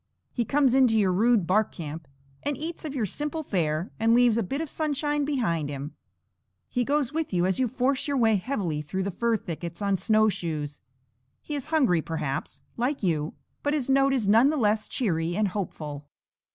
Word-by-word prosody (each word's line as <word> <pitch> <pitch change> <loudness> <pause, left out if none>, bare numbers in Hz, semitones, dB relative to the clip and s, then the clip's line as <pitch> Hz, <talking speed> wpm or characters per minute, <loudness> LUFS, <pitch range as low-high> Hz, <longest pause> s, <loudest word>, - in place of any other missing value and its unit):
He 235 - -1
comes 275 0 +3
into 255 -4 +4
your 195 -3 +3
rude 220 0 +3
bark 210 +5 +2
camp, 160 -2 -7 0.3
and 290 -2 -2
eats 320 +4 -5
of 290 -2 -5
your 240 -5 0
simple 300 - -3
fare, 165 - -1
and 225 +1 +4
leaves 245 -2 +5
a 230 - +2
bit 270 +8 -3
of 320 - -2
sunshine 295 -1 -1
behind 170 - 0
him. 140 +1 -6 0.7
He 245 - 0
goes 285 +1 0
with 320 0 -2
you, 180 -2 +2
as 190 +4 0
you 260 - +3
force 260 +3 0
your 285 -1 0
way 225 -4 +4
heavily 180 - -2
through 190 +6 -3
the 200 - -2
fir 230 +4 +1
thickets 170 -2 -6
on 200 -2 +1
snowshoes. 175 -10 0 0.6
He 300 - -6
is 285 -1 -3
hungry, 265 - +3
perhaps, 150 -3 -4
like 250 +2 -1
you, 155 -4 0 0.3
but 290 +1 0
his 270 -3 0
note 275 0 +4
is 250 -7 0
none 225 +7 +6
the 310 - 0
less 215 -3 +1
cheery 170 - -1
and 210 0 +1
hopeful. 150 -7 -5
220 Hz, 190 wpm, -26 LUFS, 175-275 Hz, 0.7 s, none